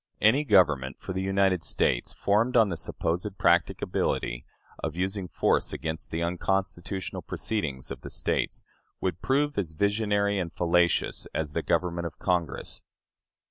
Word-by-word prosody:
Any 115 +8 +5
government 75 - +4
for 95 - -5
the 95 - -2
United 95 -2 +2
States, - - +1
formed 115 +5 +2
on 110 -3 +5
the 85 - -2
supposed 90 +4 -3
practicability 85 -7 +1 0.4
of 80 0 -2
using 95 +1 -2
force - - +1
against 80 +1 -4
the 80 +1 -2
unconstitutional 95 +1 -2
proceedings 75 -13 -3
of - - -6
the - - -8
States, - - -1 0.3
would 85 - -2
prove 145 -1 +1
as 85 -5 -3
visionary 100 +2 +1
and 85 -3 -3
fallacious 85 0 +1
as 75 -2 -2
the - - 0
government 85 -1 0
of - - -11
Congress." 90 -3 -1
90 Hz, 140 wpm, -28 LUFS, 85-100 Hz, 0.4 s, Any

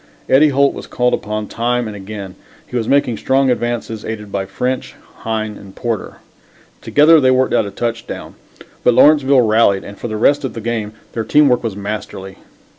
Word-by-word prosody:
Eddie 150 +3 +5
Holt 140 0 +2
was - - -9
called 125 0 0
upon 105 0 -3
time 120 +2 -1
and 105 -1 -6
again. 100 -1 -8 0.3
He - - -10
was 115 -2 -1
making 135 -5 +2
strong 135 +2 +2
advances, 120 -2 -3
aided 105 -2 -6
by 95 -1 -3
French, 125 +7 -3 0.2
Hine 110 -2 -3
and 95 -1 -14
Porter. 115 -4 -4 0.7
Together 155 +2 +5
they 130 - +4
worked 130 0 +2
out 105 - +2
a - - -5
touchdown. 115 +3 -5 0.5
But 125 - +4
Lawrenceville 140 -3 +5
rallied 110 -3 +3
and 100 0 -11
for - - -4
the 110 -1 -4
rest 140 +7 +3
of 135 - -3
the - - -4
game 110 -2 -3 0.2
their 115 - -2
teamwork 140 -2 +3
was 110 -4 -3
masterly. 100 -2 -6
115 Hz, 185 wpm, -17 LUFS, 105-130 Hz, 0.7 s, Eddie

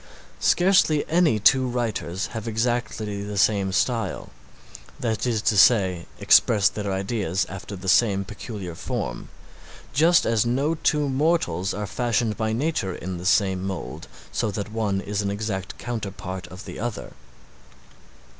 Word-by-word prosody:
Scarcely 175 -5 +3
any 165 -7 +3
two 130 +5 +4
writers 110 -6 -2
have 115 -1 -5
exactly 110 -3 -2
the 105 0 -5
same 100 -1 +2
style, 115 +3 -1 0.7
that 115 0 -1
is 110 -3 0
to 110 - +2
say, 95 -5 +4
express 100 -3 +5
their 105 -2 -4
ideas 95 -2 -1
after 95 +1 -7
the 95 0 -8
same 100 0 +3
peculiar 100 -2 -7
form, - - -4 0.6
just 165 +4 +4
as 115 -2 +2
no 135 +6 +1
two 150 -2 +1
mortals 130 - +1
are 105 +1 -3
fashioned 115 0 0
by 110 -1 -1
nature 115 - -1
in 90 -1 -5
the 90 - -3
same 95 -2 +2
mould, 95 -9 -5 0.2
so - - -1
that 100 +1 -5
one 105 -3 -1
is 105 +1 -2
an 100 - -2
exact 100 -3 -4
counterpart 100 -5 -5
of 90 +2 -11
the - - -8
other. 115 -1 -5
105 Hz, 145 wpm, -24 LUFS, 95-120 Hz, 0.7 s, express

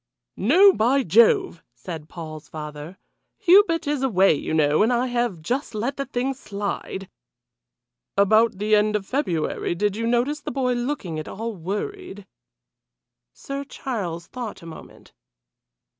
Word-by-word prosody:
"No! 365 - +6
By 260 +3 +2
Jove!" 210 -3 +4
said 155 +5 -8
Paul's 155 -3 -9
father. 150 +3 -8 0.4
"Hubert 370 -3 +4
is 290 -2 -1
away, 195 -9 +4
you 145 - -4
know, 150 -1 +3
and 225 +3 +3
I 245 +1 +1
have 240 -8 -1
just 250 - -2
let 240 +6 -2
the 275 - -3
thing 255 +2 -1
slide 200 -5 -5 0.6
" 120 0 -63 0.3
"About 215 +2 +4
the 210 +2 0
end 210 0 +2
of 205 -2 -1
February 175 - -1
did 205 +2 0
you 230 +1 -2
notice 245 +6 +1
the - - -6
boy 250 -1 0
looking 240 - -3
at 155 - -7
all 225 +2 -5
worried?" 205 - -5 1.1
Sir 275 0 -6
Charles 195 -12 -5
thought 235 -6 -7
a - - -11
moment. 165 - -12
215 Hz, 145 wpm, -23 LUFS, 175-260 Hz, 1.1 s, No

